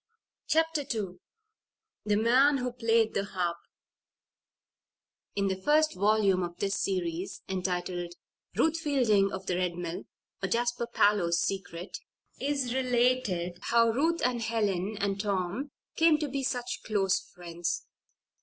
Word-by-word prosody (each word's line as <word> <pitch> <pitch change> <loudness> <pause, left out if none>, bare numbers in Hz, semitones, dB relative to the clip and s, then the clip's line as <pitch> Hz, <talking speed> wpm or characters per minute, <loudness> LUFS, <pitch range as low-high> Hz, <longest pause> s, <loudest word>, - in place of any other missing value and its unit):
CHAPTER 325 -1 +2
II 200 -9 -4 0.9
THE 210 -1 +2
MAN 255 +6 +4
WHO 250 -1 -2
PLAYED 230 -2 +2
THE 200 - 0
HARP 180 -4 -2 1.8
In 200 -1 +1
the 190 0 -2
first 305 +6 +3
volume 200 -1 +3
of 175 -1 -4
this 200 0 -1
series, 180 -2 -2
entitled, 180 -2 -3 0.4
"Ruth 325 +1 +2
Fielding 235 -10 +2
of 190 0 -6
the 180 -2 -1
Red 180 -1 0
Mill; 175 -1 -5 0.4
Or, 190 - -1
Jasper 240 +2 0
Parloe's 205 -7 +3
Secret," 190 - -3 0.4
is 275 -3 -1
related 245 -9 +1
how 230 0 +3
Ruth 325 +8 +1
and 245 -2 0
Helen 210 -3 -1
and 200 -1 0
Tom 200 +6 -2 0.3
came 325 -1 +5
to 300 -1 -2
be 275 0 -3
such 245 -2 -2
close 195 -3 +1
friends. 175 -1 -5
210 Hz, 130 wpm, -29 LUFS, 185-250 Hz, 1.8 s, came